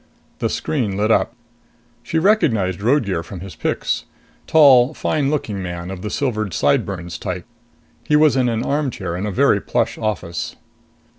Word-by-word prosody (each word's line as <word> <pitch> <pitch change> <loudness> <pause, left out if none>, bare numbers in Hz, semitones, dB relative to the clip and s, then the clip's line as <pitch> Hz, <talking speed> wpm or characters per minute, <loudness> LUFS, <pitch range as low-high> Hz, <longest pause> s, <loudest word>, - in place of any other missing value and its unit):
The - - 0
screen 110 -10 -2
lit 105 +2 +1
up. 120 - +2 0.7
She 120 +7 -2
recognized 120 - +2
Roadgear 110 - +1
from 90 +1 -9
his 95 -1 -8
pics. - - -2 0.4
Tall, 140 -3 +6
fine 145 -3 0
looking 110 -10 -2
man 90 0 -5
of 95 -2 -7
the 105 - -4
silvered 110 - -2
sideburns 85 +4 0
type. 90 -1 -4 0.6
He 150 - +1
was 150 -3 +5
in 125 -2 +2
an 115 0 -1
armchair 130 - -2
in 95 +4 -3
a - - -2
very 90 - +3
plush - - -1
office. 85 -6 -3
110 Hz, 155 wpm, -20 LUFS, 90-140 Hz, 0.7 s, Tall